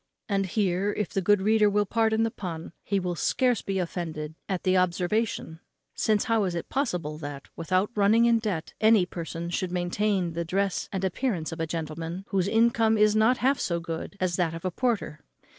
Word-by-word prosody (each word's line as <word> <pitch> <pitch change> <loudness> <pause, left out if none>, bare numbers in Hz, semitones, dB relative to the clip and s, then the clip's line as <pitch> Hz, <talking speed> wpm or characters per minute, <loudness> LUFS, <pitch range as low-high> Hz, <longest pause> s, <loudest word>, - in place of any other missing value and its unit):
And 195 -2 0
here, 195 0 0
if 210 - -2
the 195 - -1
good 205 +1 +3
reader 215 0 +4
will 205 0 +2
pardon 225 +1 +2
the 225 - 0
pun, 170 -5 -6
he 200 0 0
will 180 -1 -2
scarce 250 - +1
be 195 -1 -2
offended 165 -4 -4 0.2
at 185 -3 -2
the 185 0 +3
observation; 180 -1 0 0.3
since, 215 -2 +1
how 225 -2 +2
is 180 -2 -2
it 170 - -5
possible 175 - -2
that, 145 -2 -7
without 185 +5 0
running 215 +2 +4
in 235 -1 +4
debt, 195 -8 -3
any 220 -4 +5
person 170 -1 -5
should 180 0 -2
maintain 180 0 0
the 170 +1 -2
dress 195 +3 -1
and 190 -1 -3
appearance 190 -3 -1
of 165 - -7
a 165 - -1
gentleman 165 +3 -5
whose 190 -1 +1
income 225 0 +3
is 210 0 +4
not 220 +4 +4
half 275 +1 +3
so 170 -1 -1
good 165 +4 -6
as 180 -2 0
that 165 -3 0
of 165 - -8
a 185 - 0
porter? 225 -8 -2
190 Hz, 195 wpm, -27 LUFS, 170-215 Hz, 0.3 s, any